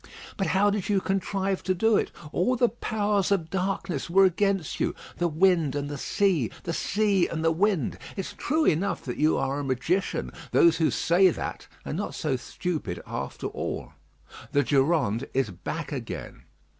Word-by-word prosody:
But 195 - -1
how 195 +4 +3
did 205 -1 -2
you 200 -2 +3
contrive 195 0 -1
to 185 - 0
do 225 +4 +3
it? - - +1 0.2
All 250 +9 +1
the 245 -1 +3
powers 210 -4 0
of 170 -5 0
darkness 185 -5 -2
were 195 +3 +6
against 190 -2 +1
you - - 0 0.2
the 175 - +2
wind 165 -3 +3
and 145 0 -2
the 145 - -4
sea 180 - +1
the 170 - -3
sea 200 -1 +2
and 160 -1 -3
the 165 - +4
wind. 180 - +1 0.2
It's 195 - -4
true 310 +2 0
enough 175 +4 +1
that 125 - -4
you 155 +1 +3
are 135 +1 -1
a - - -3
magician. 130 - -1 0.2
Those 165 -1 +5
who 160 -2 +3
say 185 +3 +4
that - - -5 0.2
are - - -4
not 200 +7 -3
so 150 -4 -1
stupid 130 - -4
after - - -5
all. - - -4 0.6
The 145 - +3
Durande 135 -3 +1
is 130 -6 +1
back 90 - -5
again. - - -6
175 Hz, 175 wpm, -27 LUFS, 145-195 Hz, 0.6 s, were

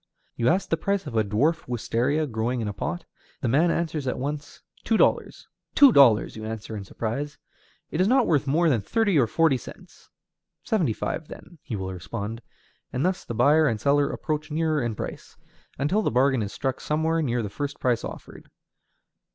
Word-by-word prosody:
You 120 - 0
ask 185 +3 +1
the 165 - +1
price 200 +1 -1
of 135 -6 -6
a 110 - +3
dwarf 140 +12 0
wistaria 125 +5 0
growing 120 -1 -2
in 110 - -2
a 105 - -3
pot. 175 - -4 0.4
The 130 - 0
man 150 +9 +3
answers 160 -4 -2
at 125 - -1
once, 145 +2 -5 0.2
"Two 225 - +2
dollars." - - +1 0.3
"Two 280 -2 +8
dollars!" 125 - +5
you 110 - -7
answer 110 0 -6
in 100 - -5
surprise, 120 +9 -4 0.5
"it 160 - 0
is 185 - +3
not 255 +2 +4
worth 145 -3 +1
more 165 +5 +3
than 125 -9 +2
thirty 200 - +1
or 120 - +3
forty 160 +3 +3
cents." - - -14 0.5
"Seventy 175 - +1
five, 155 +7 -4
then," 170 -3 -12
he 120 - -5
will 95 -1 -4
respond; 105 +5 -6 0.5
and 130 +5 -1
thus 185 0 0
the 120 - -6
buyer 150 +6 +4
and 115 -5 0
seller 140 +4 +2
approach 155 -1 -3
nearer 155 -1 0
in 120 -3 -2
price, - - -7 0.4
until 150 +11 +1
the - - +1
bargain 130 +1 +2
is 100 -1 -3
struck 130 0 -3
somewhere 160 +2 0
near 120 -5 0
the - - -3
first 145 +4 -4
price 125 -3 +1
offered. - - -9
140 Hz, 190 wpm, -25 LUFS, 115-160 Hz, 0.5 s, Two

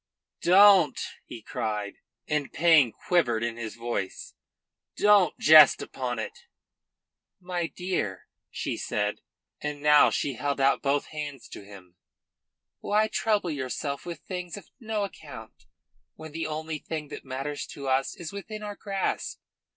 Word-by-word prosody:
"Don't!" 185 -5 +6 0.3
he 115 - -9
cried, 110 -6 -4 0.3
and 150 -2 -1
pain 155 -6 +5
quivered 120 - +1
in 120 -1 -2
his 115 -2 -6
voice. 115 -5 -4 0.6
"Don't 205 -5 +4
jest 155 -2 +8
upon 125 -2 -4
it." 110 - -7 0.9
"My 180 -2 -3
dear," 170 - -3 0.2
she - - -4
said, - - -2 0.4
and 150 -1 -4
now 150 0 +6
she 140 - -1
held 140 +3 -2
out 135 0 +3
both 140 0 +1
hands 145 -4 -6
to - - -9
him, 95 -3 -14 0.8
"why 215 +1 +1
trouble 210 -7 0
yourself 140 0 -4
with 170 -3 -7
things 180 0 -6
of 205 - -13
no 220 -3 -2
account, 200 - -10 0.5
when 160 -1 -10
the 160 +1 -3
only 155 0 -4
thing 155 -2 -6
that - - -8
matters 135 +2 -5
to 140 -1 -8
us 135 +1 +1
is 170 +1 -8
within 215 +2 -7
our 205 -1 -5
grasp? 195 -1 -3
150 Hz, 140 wpm, -27 LUFS, 130-180 Hz, 0.9 s, jest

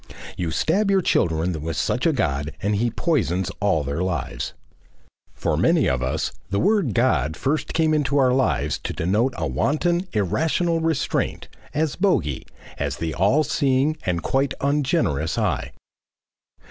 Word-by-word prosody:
You 90 -3 -2
stab 195 - +1
your 195 -2 +3
children 80 - +1
with 80 +1 -4
such - - 0
a - - +4
God 70 +2 -1
and 105 +2 0
he 120 +3 +1
poisons 110 - 0
all 100 -7 +1
their 70 +4 -3
lives. 90 -4 -3 0.8
For - - -1
many - - +3
of 65 -1 0
us 65 0 -1 0.2
the 100 0 0
word 200 - +2
"God" 80 - +1
first 150 +3 -1
came 160 -1 +3
into 145 -2 +1
our 130 -2 +4
lives 115 - +1
to - - -4
denote 105 +9 0
a 85 - -1
wanton, 165 - 0
irrational 160 - +1
restraint, 160 -3 -1 0.3
as 155 -1 0
Bogey, 90 - 0 0.3
as 70 -3 -2
the 80 -1 -3
All 115 - +3
Seeing 140 +1 +1
and 85 -2 -1
quite 135 0 0
ungenerous 140 - 0
Eye. - - -1
115 Hz, 150 wpm, -23 LUFS, -, 0.8 s, a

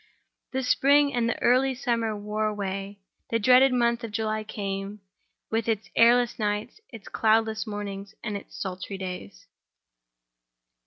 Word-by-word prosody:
The 265 0 -2
spring 280 +3 +4
and 235 -1 +1
the - - -2
early 260 +2 +3
summer 230 -3 -1
wore 210 +1 -2
away. 200 -1 -4 0.3
The 230 - +1
dreaded 255 +4 +6
month 235 -1 +1
of 230 - -4
July 215 0 -2
came, 200 -1 -5 0.5
with 225 0 0
its 220 -1 -2
airless 240 +1 +4
nights, 210 - -2
its 225 -5 -11
cloudless 220 0 +1
mornings, 205 -1 -6
and 215 -3 -3
its 200 - -8
sultry 190 +1 -5
days. 180 - -7
215 Hz, 140 wpm, -26 LUFS, 205-235 Hz, 0.5 s, dreaded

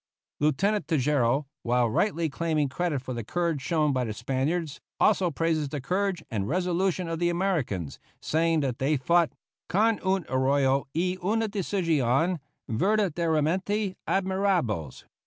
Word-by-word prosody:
Lieutenant 195 +9 +1
Tejeiro, 140 -3 +2 0.2
while 120 0 +2
rightly 165 - +1
claiming 155 -1 0
credit 150 -2 -2
for 130 - -5
the 120 -1 -4
courage 170 +3 -1
shown 150 0 +1
by 130 -1 0
the 110 -3 -3
Spaniards, 135 +7 -2 0.2
also 195 -4 +3
praises 160 -2 0
the 145 - -4
courage 185 +4 -1
and 100 -3 -1
resolution 180 +1 0
of 165 -1 -3
the 175 0 +2
Americans, 160 - -1 0.2
saying 165 0 +1
that 130 -4 -2
they 145 +3 +2
fought, 170 +5 +3 0.4
"con 215 +3 +2
un 190 -1 +1
arrojo 135 0 +2
y 180 +2 0
una 220 +4 +1
decision 170 - +1 0.3
verdaderamente 185 - +1
admirables." 185 - 0
165 Hz, 135 wpm, -27 LUFS, 135-185 Hz, 0.4 s, also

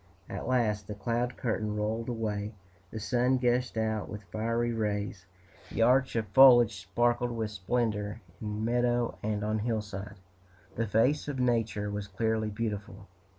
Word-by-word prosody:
At - - -5
last 110 -5 +1
the 105 - -5
cloud 120 +3 -1
curtain 110 -3 -1
rolled 110 +3 -2
away, 105 -2 -2 0.4
the 110 - -6
sun 125 +4 +2
gushed 125 -1 +1
out 110 -1 -1
with 105 0 -7
fiery 115 +2 0
rays, 105 -4 -2 0.4
the 115 - +1
arch 130 +2 +3
of 115 -2 +1
foliage 120 -3 +7
sparkled 120 +6 +1
with 115 -3 -3
splendor 105 0 -1 0.2
in 105 0 -3
meadow 120 0 +1
and 105 -1 -1
on 110 +1 0
hillside, 105 -3 -3 0.6
the 115 0 -1
face 120 +10 +2
of 145 -2 -3
Nature 115 -4 0
was 105 0 -4
cleanly 110 +2 0
beautiful. 105 -2 -4
110 Hz, 150 wpm, -30 LUFS, 105-120 Hz, 0.6 s, foliage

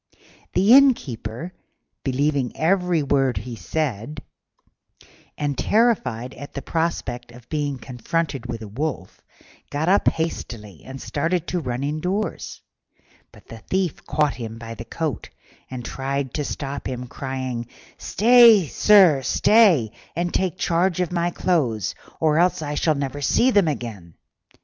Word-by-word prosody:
The 195 +6 +5
Innkeeper, 170 - +2 0.5
believing 140 -1 0
every 180 -1 +2
word 135 -4 +1
he 115 +4 -5
said, 140 +1 -3 1.2
and 145 -1 -1
terrified 130 - +1
at 140 - -10
the 140 - -5
prospect 130 -8 -2
of 120 0 -15
being 145 -3 -2
confronted 135 +2 -3
with 115 -2 -5
a - - -7
wolf, 125 -2 -5 0.5
got 150 +4 -1
up 200 - +3
hastily 110 - -3
and 135 +1 -9
started 165 +5 -1
to 180 - -1
run 125 -3 -3
indoors; 180 +8 -3 0.7
but - - -18
the 115 - -9
Thief 185 - -2
caught 150 -2 +1
him 115 -2 -7
by 115 0 -8
the 115 +1 -9
coat 160 +1 -4 0.4
and 125 -2 -6
tried 135 -1 -3
to 150 - -2
stop 140 0 -5
him, 125 -1 -4
crying, 130 -2 -5 0.3
"Stay, 230 -3 +6
sir, 180 -3 +5
stay, 170 - +4 0.2
and 175 +1 -2
take 185 -1 0
charge 175 0 +1
of 180 -2 -1
my 175 -1 0
clothes, 135 - 0 0.3
or 155 0 +2
else 180 -1 +2
I 145 0 -3
shall 155 +1 +1
never 140 0 -4
see 250 - +3
them 205 -7 +4
again." 110 - -5
145 Hz, 140 wpm, -23 LUFS, 125-175 Hz, 1.2 s, Stay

